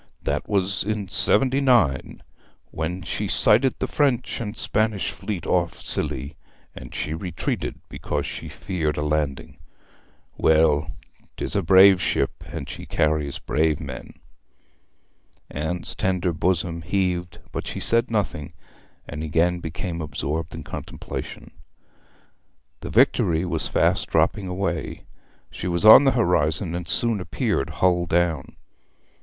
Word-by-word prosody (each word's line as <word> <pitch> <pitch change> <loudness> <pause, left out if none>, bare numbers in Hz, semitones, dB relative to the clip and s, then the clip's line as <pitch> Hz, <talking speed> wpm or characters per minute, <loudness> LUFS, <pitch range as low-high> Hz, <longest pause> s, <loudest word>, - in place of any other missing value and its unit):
That - - -2
was 95 -2 +1
in 105 -2 -3
seventy 130 +7 +2
nine, 115 - +2 0.5
when 85 +3 -4
she 105 +4 -3
sighted 115 +6 +4
the - - -1
French 130 -5 0
and 105 -1 -5
Spanish 110 -2 0
fleet 100 -6 -5
off - - 0
Scilly, 70 +3 -2 0.4
and - - -10
she 75 - -3
retreated 85 +1 -4
because - - -3
she - - -6
feared 80 -6 -3
a 75 - -1
landing. 75 -3 -2 0.8
Well, 80 -1 +3 0.5
'tis - - -4
a 100 - +2
brave 95 +1 +7
ship - - -1
and 75 -2 -6
she - - -8
carries 75 -2 0
brave 75 0 0
men!' 65 -4 -8 1.4
Anne's 80 +4 -4
tender 90 -2 0
bosom 85 0 -1
heaved, 90 -1 -1
but - - -5
she - - -4
said 115 +1 +2
nothing, 100 -10 -2 0.5
and 75 +1 -6
again 85 +3 +1
became 85 +1 -5
absorbed 75 +2 -4
in 80 - -7
contemplation. - - -7 1.3
The - - -7
Victory 80 +1 +3
was 90 - -2
fast - - +1
dropping 95 - +1
away. 90 -4 -3 0.5
She 90 - -5
was 85 +3 0
on 110 +6 +10
the 135 - +5
horizon, 85 -4 +2
and 85 -1 -4
soon 115 +5 +2
appeared 70 - -1
hull 90 -1 +1
down. 85 -4 0
85 Hz, 130 wpm, -23 LUFS, 80-100 Hz, 1.4 s, on